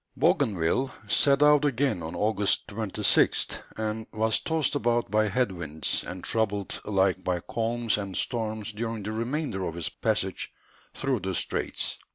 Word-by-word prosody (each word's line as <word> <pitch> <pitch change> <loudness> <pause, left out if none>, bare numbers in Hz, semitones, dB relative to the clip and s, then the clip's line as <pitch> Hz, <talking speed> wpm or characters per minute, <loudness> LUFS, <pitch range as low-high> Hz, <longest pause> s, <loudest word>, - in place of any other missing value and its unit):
Bougainville 105 +7 +2 0.2
set 140 0 +4
out 150 0 +6
again 135 - +1
on 80 +2 -5
August 105 +1 +1
26th, 105 -2 +2 0.2
and 110 0 -3
was 110 -1 +2
tossed 160 -3 +1
about 120 -2 0
by 110 0 +3
head 110 +2 +1
winds, 80 -4 -2
and 90 +1 -7
troubled 105 -3 -1
alike 95 -2 +1
by 90 -1 0
calms 115 +3 -1
and 100 -2 -4
storms 110 -3 -1
during 115 0 -4
the 105 - -3
remainder 115 -2 -2
of 85 -2 -3
his 85 -2 -2
passage - - -1 0.4
through 135 -3 0
the 95 -1 -3
straits. - - -1
110 Hz, 150 wpm, -27 LUFS, 95-120 Hz, 0.4 s, out